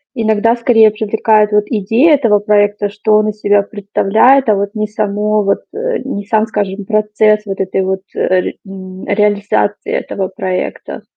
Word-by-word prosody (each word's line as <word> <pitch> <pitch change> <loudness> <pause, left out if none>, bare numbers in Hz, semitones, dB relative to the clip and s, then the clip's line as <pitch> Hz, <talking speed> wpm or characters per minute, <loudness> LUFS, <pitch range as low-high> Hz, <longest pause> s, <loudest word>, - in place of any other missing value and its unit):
иногда 225 +1 +1
скорее 230 -2 +4
привлекает 215 0 +1
вот 210 0 +2
идея 230 - +2
этого 230 -7 +2
проекта, 205 0 +1
что 210 +1 0
он 215 0 +1
из 210 0 -7
себя 205 0 +3
представляет, 215 +5 +2
а, 210 - +4
вот 200 +2 -3
не 215 0 -2
само 210 0 -1
вот, 200 0 0
э, 470 +2 -3
не 205 -7 -5
сам, 215 +1 +1
скажем, 205 -2 -3
процесс 215 0 +1
вот 195 -1 -6
этой 190 0 -1
вот 190 0 -2
рарит 185 -1 0
м, 190 -1 -10
реализации 205 0 0
этого 190 -1 -3
проекта? 185 -1 -5
210 Hz, 160 wpm, -14 LUFS, 200-220 Hz, -, скорее